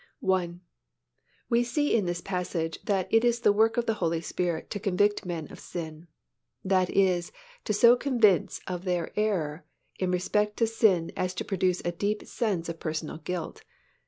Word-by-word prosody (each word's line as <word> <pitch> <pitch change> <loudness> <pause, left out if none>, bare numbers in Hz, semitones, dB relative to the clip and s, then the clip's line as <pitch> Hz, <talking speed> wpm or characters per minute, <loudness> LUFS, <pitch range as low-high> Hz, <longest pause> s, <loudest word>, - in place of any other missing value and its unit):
I. 180 -2 +1 0.9
We 235 0 +3
see 290 +5 +1
in 210 -4 +2
this 175 0 -2
passage 175 -4 -3
that 195 -3 0
it 225 +1 +5
is 240 -1 +2
the 205 - +5
work 225 +2 +3
of 240 - +1
the 225 - +1
Holy 165 -1 +1
Spirit 170 0 -3
to 205 - -3
convict 205 0 +1
men 165 -3 -4
of - - -11
sin. 160 -1 -7 0.6
That 185 -1 +2
is, 180 -3 +2 0.3
to 215 - 0
so 235 +4 +7
convince 230 - +2
of 180 -1 -4
their 180 -3 -1
error 180 -7 -1 0.4
in 185 - 0
respect 210 +3 0
to 230 - +3
sin 215 -7 +2
as 185 0 -2
to - - -3
produce 185 -2 0
a 175 - +1
deep 205 +4 -2
sense 200 -8 -2
of 165 -1 -5
personal 155 -1 -4
guilt. 175 +1 -5
185 Hz, 175 wpm, -28 LUFS, 175-215 Hz, 0.9 s, so